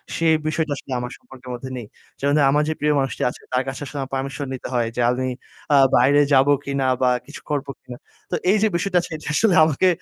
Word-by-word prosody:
সেই 165 Hz, -1 st, +3 dB
বিষয়টা 155 Hz, -1 st, -1 dB
আসলে 135 Hz, -, -11 dB
আমার 125 Hz, 0 st, -5 dB
সম্পর্কের 130 Hz, -, -14 dB
মধ্যে 130 Hz, +2 st, -6 dB
নেই। 120 Hz, -, -6 dB, 0.3 s
যেমন 140 Hz, +1 st, +1 dB
ধরেন 140 Hz, -, +4 dB
আমার 150 Hz, +1 st, +3 dB
যে -, -, +1 dB
প্রিয় 150 Hz, 0 st, +2 dB
মানুষটি 135 Hz, -1 st, -2 dB
আছে -, -, -11 dB
তার 125 Hz, +1 st, +2 dB
কাছে 135 Hz, +2 st, -5 dB
আসলে 145 Hz, -, -8 dB
আমার 135 Hz, -, -6 dB
permission 135 Hz, +1 st, -4 dB
নিতে 130 Hz, -, -6 dB
হয় 120 Hz, -2 st, +1 dB
জালনি 125 Hz, +2 st, +1 dB, 0.4 s
আ -, -, +7 dB, 0.2 s
বাইরে 140 Hz, +4 st, +5 dB
যাব 135 Hz, +1 st, +5 dB, 0.2 s
কিনা? 140 Hz, -1 st, -1 dB, 0.2 s
বা 125 Hz, -, +4 dB, 0.2 s
কিছু 145 Hz, -, -11 dB
করব 145 Hz, -1 st, -2 dB
কিনা? 125 Hz, -1 st, -10 dB, 0.3 s
তো -, -, +1 dB, 0.2 s
এই 215 Hz, -, +4 dB
যে -, -, +5 dB
বিষয়টা 180 Hz, +1 st, 0 dB
আজকে 165 Hz, -, -8 dB
এটা 155 Hz, -, -12 dB
আসলে 200 Hz, -1 st, +3 dB
আমাকে 160 Hz, +4 st, +2 dB
140 Hz, 230 wpm, -22 LUFS, 130-155 Hz, 0.4 s, আ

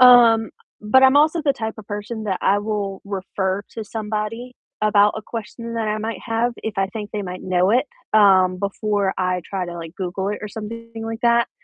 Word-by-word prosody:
um, 235 Hz, -3 st, +7 dB, 0.3 s
but 240 Hz, +5 st, +4 dB
I'm 265 Hz, +2 st, +6 dB
also 310 Hz, +3 st, +4 dB
the 280 Hz, -2 st, +3 dB
type 220 Hz, -4 st, -4 dB
of 210 Hz, -, -10 dB
person 215 Hz, +1 st, -5 dB
that 190 Hz, -3 st, -1 dB
I 200 Hz, -, +4 dB
will 205 Hz, -2 st, -3 dB
refer 195 Hz, 0 st, -2 dB
to 225 Hz, -2 st, -6 dB
somebody 220 Hz, +3 st, -4 dB, 0.3 s
about 210 Hz, -1 st, +4 dB
a 215 Hz, -, -5 dB
question 230 Hz, +1 st, -6 dB
that 225 Hz, -2 st, -1 dB
I 210 Hz, -, 0 dB
might 220 Hz, -2 st, -4 dB
have 235 Hz, +1 st, +1 dB
if 220 Hz, -1 st, -3 dB
I 195 Hz, 0 st, +2 dB
think 210 Hz, 0 st, -6 dB
they 210 Hz, -, -3 dB
might 180 Hz, -1 st, -6 dB
know 185 Hz, +1 st, +2 dB
it, 250 Hz, +5 st, +3 dB, 0.3 s
um, 190 Hz, -3 st, +5 dB
before 200 Hz, 0 st, -1 dB
I 185 Hz, -1 st, 0 dB
try 190 Hz, -2 st, -3 dB
to, 175 Hz, -1 st, -7 dB
like, 165 Hz, 0 st, -8 dB
Google 190 Hz, +1 st, -3 dB
it 205 Hz, -, -3 dB
or 210 Hz, -, -4 dB
something 230 Hz, +2 st, -8 dB
like 225 Hz, 0 st, -5 dB
that, 235 Hz, 0 st, +4 dB
210 Hz, 205 wpm, -22 LUFS, 195-230 Hz, 0.3 s, um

